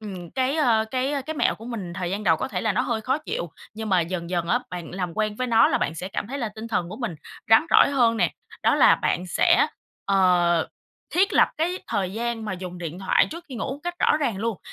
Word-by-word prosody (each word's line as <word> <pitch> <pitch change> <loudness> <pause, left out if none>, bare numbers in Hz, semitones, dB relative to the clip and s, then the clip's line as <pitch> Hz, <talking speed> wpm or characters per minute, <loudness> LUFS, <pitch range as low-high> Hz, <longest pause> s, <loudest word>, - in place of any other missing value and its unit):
ừm, 185 -5 -8
cái, 265 +3 0
ơ, 230 -7 +3
cái, 260 +2 -1
ơ, 280 -2 -1
cái 315 +3 -5
mẹo - - +2
của 225 - -12
mình 200 -8 -5
thời 180 -1 -3
gian 205 +2 -3
đầu - - +4
có - - -3
thể - - -3
là 220 -2 +1
nó 230 - +1
hơi 235 -3 -1
khó 260 +6 0
chịu, 175 - -4 0.2
nhưng 220 0 -5
mà 185 -3 +3
dần 170 0 -4
dần 170 -2 -1
á 245 - +3
bạn 175 -4 -6
làm 180 -2 -4
quen 215 -1 -1
với 255 - -1
nó 230 -1 +5
là - - +1
bạn - - -1
sẽ 180 +4 -5
cảm 200 - -4
thấy 280 - -4
là 235 -5 -2
tinh 220 +1 -7
thần 180 -6 -1
của 210 - -7
mình 235 -9 -4 0.4
rắn 225 +9 +6
rỏi - - +6
hơn 235 -4 +3
nè. - - +1 0.3
Đó - - +4
là - - +6
bạn 180 - -1
sẽ, 175 - +3 0.4
ờ, 180 -4 +3 0.5
thiết 380 +3 +3
lập - - +5
cái 350 +4 -1
thời 190 -2 -2
gian 230 0 -3
mà 210 - -3
dùng 180 -1 -7
điện 170 +1 -6
thoại 190 - +3
trước 335 +2 -8
khi 260 - -8
ngủ 265 +5 -4
cách 350 0 -3
rõ - - +3
ràng 260 -10 -1
luôn, 225 -1 -2
220 Hz, 260 wpm, -24 LUFS, 180-255 Hz, 0.5 s, rắn